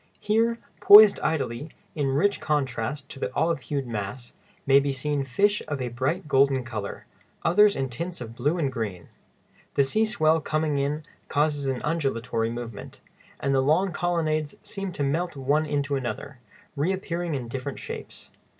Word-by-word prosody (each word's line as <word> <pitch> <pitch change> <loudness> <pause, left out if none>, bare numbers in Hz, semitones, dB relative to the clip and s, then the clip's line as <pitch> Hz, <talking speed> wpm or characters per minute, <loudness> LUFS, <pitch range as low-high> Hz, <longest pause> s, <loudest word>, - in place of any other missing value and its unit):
Here, 230 +2 +1 0.2
poised 205 0 +9
idly, 145 -2 -2 0.2
in 145 -3 -1
rich 160 +10 +2
contrast 135 -2 -1
to - - -9
the - - -2
olive 165 -2 +1
hued 140 0 -3
mass, 115 +1 -5 0.3
may 135 0 +6
be 140 0 -1
seen 140 +1 -1
fish 200 +11 +1
of 145 -2 -3
a 125 -1 -2
bright 130 +9 -2
golden 135 -2 +3
color, 110 -5 -6 0.4
others 210 +4 +5
in 135 0 -1
tints 170 +8 -5
of 115 -2 -7
blue 145 +8 0
and 145 -5 0
green. 100 -8 -5 0.7
The 140 - +5
sea 215 +11 +1
swell 160 -7 +2
coming 155 -2 0
in 145 +3 -1 0.2
causes 145 -1 0
an 130 -2 -2
undulatory 125 -7 -1
movement, 115 -3 -7 0.4
and 140 - 0
the 135 - +3
long 165 +8 +2
colonnades 155 -4 -1
seem 195 -1 -5
to 145 - -2
melt 165 +5 -1
one 145 +3 +1
into 145 -1 -1
another, 135 +1 -5 0.4
reappearing 175 +1 -1
in 125 -3 -4
different 130 +3 -5
shapes. - - -8
145 Hz, 160 wpm, -26 LUFS, 130-165 Hz, 0.7 s, poised